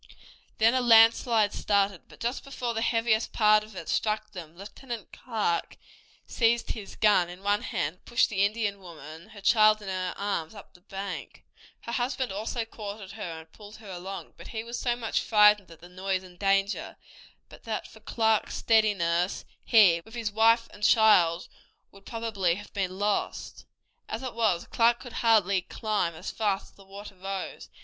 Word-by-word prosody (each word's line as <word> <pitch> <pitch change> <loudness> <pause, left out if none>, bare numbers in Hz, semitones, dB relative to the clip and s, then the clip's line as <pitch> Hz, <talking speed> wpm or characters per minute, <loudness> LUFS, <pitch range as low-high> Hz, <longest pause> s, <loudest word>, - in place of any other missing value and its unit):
Then 225 +2 +4
a 260 - +2
landslide 225 -2 +5
started, 200 -3 0
but - - -17
just 240 +3 -3
before 250 -4 -4
the 225 - -2
heaviest 230 -1 +1
part 215 -1 +4
of 215 -1 -14
it 165 - -8
struck 215 0 -1
them 170 -4 -10
Lieutenant 230 +4 -8
Clark 215 -8 -2 0.5
seized 235 0 +1
his 210 -3 -7
gun 200 -5 +3
in 180 +2 -11
one 205 +1 +1
hand, 155 +5 -3
and - - -39
pushed 240 - +2
the 200 -2 +1
Indian 205 -1 -1
woman, 160 -2 -12
her 205 - -13
child 215 +1 +5
in 205 -2 -8
her 185 -1 -3
arms, 200 -3 -3
up 205 - -13
the 180 - -20
bank. 195 0 -7 0.4
Her 235 - -7
husband 250 0 -2
also 220 +4 -3
caught 210 -2 -8
at 195 -3 -10
her 175 -6 -7
and 160 0 -20
pulled 210 0 -13
her 210 -3 -11
along, 185 +2 -7
but - - -11
he 220 -1 -5
was 235 +1 -6
so 240 -2 0
much 230 -2 -1
frightened 210 -3 +4
at 165 -1 -15
the 175 - -12
noise 185 +1 -3
and 180 -1 -15
danger 195 +1 0 0.5
that - - -15
but - - -4
for - - -16
Clark's 220 -2 0
steadiness 190 -6 +1 0.2
he, 195 -8 +5
with 220 +5 -14
his 225 -3 -3
wife 230 +2 +4
and 205 - -15
child, 185 -7 +4 0.4
would 195 0 -17
probably 210 -7 -1
have 205 +2 -11
been 190 -2 -3
lost. 205 +1 -2 0.4
As - - -4
it 255 - -5
was, 215 -7 +1
Clark 235 +1 +2
could 245 -3 -10
hardly 200 -5 +3
climb 205 -4 -2
as - - -6
fast 205 -3 -2
as - - -30
the 195 - -17
water 200 +1 -10
rose. 195 0 -6
205 Hz, 185 wpm, -27 LUFS, 190-225 Hz, 0.5 s, landslide